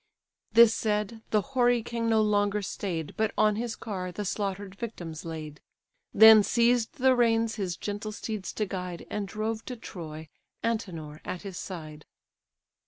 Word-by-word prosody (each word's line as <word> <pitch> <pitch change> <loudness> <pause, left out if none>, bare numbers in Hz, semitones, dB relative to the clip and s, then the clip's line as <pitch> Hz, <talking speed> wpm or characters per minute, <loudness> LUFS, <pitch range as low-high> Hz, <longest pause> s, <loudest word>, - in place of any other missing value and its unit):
This 230 -1 +8
said, 215 +1 -1
the 215 - +3
hoary 245 -2 +3
king 230 0 -2
no 220 -1 +4
longer 205 -1 +1
stay'd, 170 -5 -4
But 220 -1 +1
on 215 -1 +4
his 235 0 -3
car 185 -5 -5
the 205 +4 -5
slaughter'd 200 -1 -3
victims 175 -8 -7
laid: 155 -2 -7 0.5
Then 220 0 +9
seized 235 +3 +2
the 260 -2 +4
reins 230 -2 +2
his 185 -4 -2
gentle 205 +1 -4
steeds 215 -2 -5
to 215 - -1
guide, 180 -3 -5
And 210 -1 -2
drove 220 +2 -3
to 250 - -5
Troy, 160 -8 -8 0.4
Antenor 170 -10 -3
at 180 - -5
his 195 -3 -6
side. 155 -5 -8
210 Hz, 155 wpm, -28 LUFS, 180-225 Hz, 0.5 s, Then